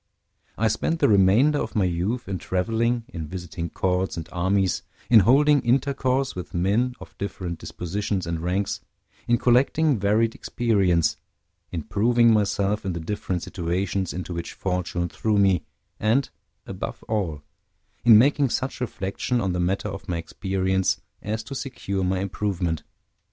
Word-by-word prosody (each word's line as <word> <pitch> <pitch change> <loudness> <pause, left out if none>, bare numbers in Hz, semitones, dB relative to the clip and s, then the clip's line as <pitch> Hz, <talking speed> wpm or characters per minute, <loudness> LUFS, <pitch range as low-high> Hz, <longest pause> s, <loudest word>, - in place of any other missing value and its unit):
I 110 - +2
spent 110 +10 0
the - - +4
remainder 110 +9 +4
of - - -4
my 105 - +3
youth 90 +8 -1
in 95 -2 -3
traveling, 115 +7 0
in 80 - -6
visiting 85 -1 -5
courts 90 -1 -1
and 80 -1 -5
armies, 95 +2 +1 0.3
in 115 - +9
holding 140 +7 +5
intercourse 135 +1 +1
with 90 -1 -7
men 105 +8 +1
of - - -12
different 90 -4 -4
dispositions 95 +1 -3
and 85 -1 -2
ranks, 90 +4 -1 0.5
in 120 - +4
collecting 130 +3 +3
varied 110 +3 +2
experience, 90 -10 +1 0.5
in 80 -3 -3
proving 115 +4 +3
myself 105 0 +1
in 95 -2 -2
the 85 - -4
different 90 0 -3
situations 90 +1 -2
into 90 0 -5
which 85 0 -5
fortune 90 -2 -2
threw 105 +4 0
me, 95 -3 +3 0.3
and, 120 +6 +1 0.3
above - - -6
all, 85 -9 -2 0.6
in 115 -3 +8
making 140 +3 +4
such 130 +2 -2
reflection 120 +2 -2
on 95 -5 0
the 90 - -1
matter 90 +3 0
of - - -8
my 85 - 0
experience 95 +2 0 0.2
as 110 +2 -3
to 135 - -8
secure 100 -8 -3
my 95 0 0
improvement. 95 -5 -2
100 Hz, 150 wpm, -24 LUFS, 90-115 Hz, 0.6 s, in